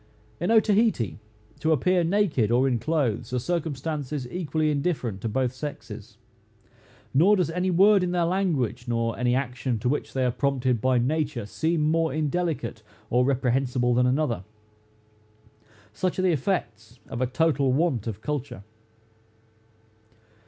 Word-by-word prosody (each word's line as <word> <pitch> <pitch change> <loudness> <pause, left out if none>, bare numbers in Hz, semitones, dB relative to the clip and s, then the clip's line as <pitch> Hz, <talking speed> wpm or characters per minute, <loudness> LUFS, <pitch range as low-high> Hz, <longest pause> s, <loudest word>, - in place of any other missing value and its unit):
In 175 - -1
Otaheite, 215 - +2 0.4
to 160 - +1
appear 180 +4 +2
naked 165 - +1
or 125 +3 +3
in 125 -3 +1
clothes, 125 -6 -1
are - - +1
circumstances 150 -2 -3
equally 155 -3 -1
indifferent 140 - -2
to 115 - -2
both 125 +2 0
sexes; 145 +3 -8 1.0
nor 180 +10 +5
does 180 -5 0
any 180 +2 -1
word 195 +3 +5
in 180 - 0
their 175 -1 +1
language, 165 - -1
nor 115 -1 -1
any 125 +1 +1
action 125 -2 -2
to 110 - -2
which 145 +4 -2
they 130 -1 0
are 125 - +2
prompted 130 -2 0
by 130 +1 +2
nature, 135 -1 -1
seem 160 +9 -1
more 165 -1 +1
indelicate 155 -5 -2 0.3
or 125 +1 +4
reprehensible 125 -1 +1
than 125 +1 +3
another. 125 -7 0 1.5
Such 185 +10 -2
are 185 - 0
the 185 - +4
effects 120 - -2
of 120 - -5
a 130 - +2
total 140 0 +1
want 130 - 0
of 110 -1 -5
culture. 140 -9 -4
140 Hz, 145 wpm, -25 LUFS, 125-165 Hz, 1.5 s, nor